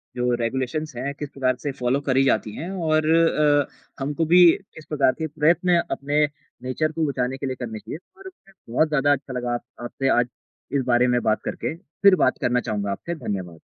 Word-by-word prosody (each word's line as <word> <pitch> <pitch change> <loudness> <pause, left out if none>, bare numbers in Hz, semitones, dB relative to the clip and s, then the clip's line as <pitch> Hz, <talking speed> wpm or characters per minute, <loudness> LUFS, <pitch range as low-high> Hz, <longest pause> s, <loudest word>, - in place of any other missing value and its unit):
जो 125 0 +1
रेगुलेशंस 130 +5 -2
हैं 135 +4 -3
किस 150 - -4
प्रकार 130 -2 0
से 145 0 -3
फ़ॉलो 130 +1 0
करी 135 -1 +2
जाती 110 -4 +1
हैं। 170 +4 -5
और 155 -4 +1
अ, 150 -3 +3 0.3
हमको 145 +4 -1
भी 175 +2 +7 0.3
किस 160 - -11
प्रकार 140 -4 +3
के 160 - -1
प्रयत्न 170 +3 +2
अपने 145 +2 +1 0.4
नेचर 140 +5 -1
को 160 0 -1
बचाने 130 -1 -2
के 140 - -5
लिए 130 - -2
करने 110 -3 -5
चाहिए। 150 - -7 0.2
और 380 -1 -10 0.4
बहुत 155 +7 +2
ज़्यादा 145 -1 +2
अच्छा 135 -1 -1
लगा 125 -1 -2
आप 120 - -3 0.2
आपसे 135 +2 -2
आज 120 - +1 0.5
इस 135 -2 +1
बारे 125 +1 +4
में 125 0 +2
बात 110 - +1
करके - - -3
फ़िर 185 +3 +3
बात - - +1
करना 125 0 +2
चाहूँगा 100 -2 -1
आपसे। 170 - -4
धन्यवाद। 90 - -5
140 Hz, 195 wpm, -23 LUFS, 125-155 Hz, 0.5 s, भी